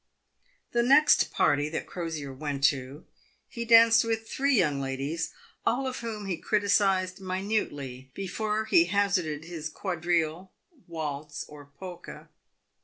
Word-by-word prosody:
The 235 - +2
next 280 +5 +5
party 145 +1 +2
that 160 - -4
Crosier 160 -6 -5
went 140 0 -4
to, 135 +2 0 0.4
he 235 0 -6
danced 230 0 +7
with 225 -1 -2
three 275 +3 +1
young 150 -7 +2
ladies, 135 +5 -3 0.3
all 260 +3 +1
of 260 -1 -3
whom 220 -3 -5
he 185 -3 -2
criticised 195 -2 +1
minutely 185 - -3
before 210 +3 -2
he 170 -6 +5
hazarded 180 -6 0
his 165 -2 -6
quadrille, 175 0 -2 0.4
waltz, 150 -3 -5
or 145 -1 -12
polka. 180 0 -9
180 Hz, 125 wpm, -28 LUFS, 150-215 Hz, 0.4 s, danced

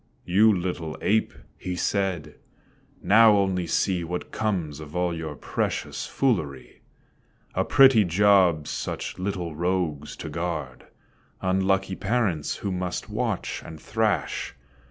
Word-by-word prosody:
"You 105 +5 +5
little 90 -4 -3
ape," 110 +2 +1 0.3
he 90 -1 -4
said, 90 -5 -1 0.7
"now 110 0 +6
only 95 -3 0
see 90 +1 +1
What 90 +2 -5
comes 90 -9 -2
of 75 +1 -10
all 90 -1 0
your 80 -2 -5
precious - - -3
foolery; 75 - -1 0.7
A - - +1
pretty 130 -5 +6
job 90 -4 +4
such - - -4
little 90 -4 -3
rogues 85 -4 -1
to - - -7
guard. 80 -7 -4 0.5
Unlucky 95 0 +1
parents 100 -9 0
who 100 - 0
must 90 -1 -3
watch - - -2
and 80 -1 -10
thrash. - - -1
90 Hz, 120 wpm, -25 LUFS, 80-100 Hz, 0.7 s, now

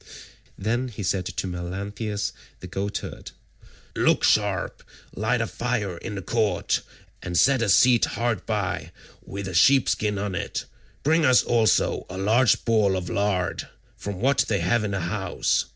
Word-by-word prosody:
Then 120 +6 -1
he 105 -4 -7
said 95 0 -1
to - - -4
Melanthius 100 +4 -4 0.3
the - - -9
goatherd, 100 +2 -5 0.7
"Look - - +2
sharp, - - +1 0.3
light 115 +4 0
a - - +1
fire 115 -7 -2
in 110 - -6
the 95 - -5
court, 110 0 0 0.4
and 90 -2 -3
set 135 +5 +4
a 115 - +1
seat 120 +5 +5
hard 120 -1 -2
by 105 -5 -2 0.3
with 100 0 -6
a 95 - -5
sheep 130 +9 +5
skin 105 -1 0
on 100 -1 -3
it; 90 - -3 0.4
bring 160 +3 +3
us 130 -3 +5
also 115 -2 +2
a 95 - -6
large 110 +6 +3
ball 105 -4 +3
of 90 -1 -5
lard, 100 -3 -1 0.3
from 100 -2 -6
what 135 +5 +2
they 100 -5 0
have 110 +6 +1
in 105 - -1
the 95 -1 -2
house. 95 +2 0
105 Hz, 160 wpm, -25 LUFS, 95-115 Hz, 0.7 s, seat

